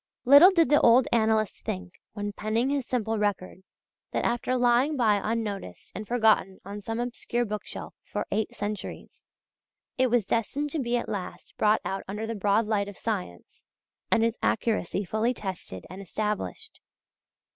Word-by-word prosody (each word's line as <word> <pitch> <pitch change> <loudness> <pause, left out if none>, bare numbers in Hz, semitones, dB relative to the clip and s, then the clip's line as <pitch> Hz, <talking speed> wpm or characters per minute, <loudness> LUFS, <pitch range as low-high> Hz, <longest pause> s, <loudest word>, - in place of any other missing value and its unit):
Little 285 +8 +9
did 335 -8 +3
the 295 - +5
old 240 +2 +6
annalist 220 -2 +1
think, 90 -1 -6
when 205 -1 -4
penning 225 +6 0
his 280 -4 -1
simple 225 -3 -1
record, 200 -3 -2 0.5
that - - 0
after 240 +2 0
lying 250 +5 +3
by 215 -5 +3
unnoticed 215 -3 -4
and 215 0 -6
forgotten 220 -5 +2
on 200 +1 -7
some 225 +3 -4
obscure 240 0 -2
bookshelf 210 -1 -6
for - - -4
eight 220 - -1
centuries, 205 0 -6 0.8
it 260 - +5
was 240 -4 +2
destined 275 +8 -1
to 315 - -2
be 240 -2 0
at 235 - -3
last 200 -4 -6
brought 215 +1 +3
out 195 - -3
under 210 +3 -4
the 225 - -3
broad 205 +1 +2
light 210 -2 0
of 205 - -9
science, 190 - -5 0.5
and 225 - +3
its 230 -1 -1
accuracy 210 -4 0
fully 220 +6 0
tested 185 - -6
and 185 +2 -9
established. 210 - -4
220 Hz, 160 wpm, -27 LUFS, 205-240 Hz, 0.8 s, Little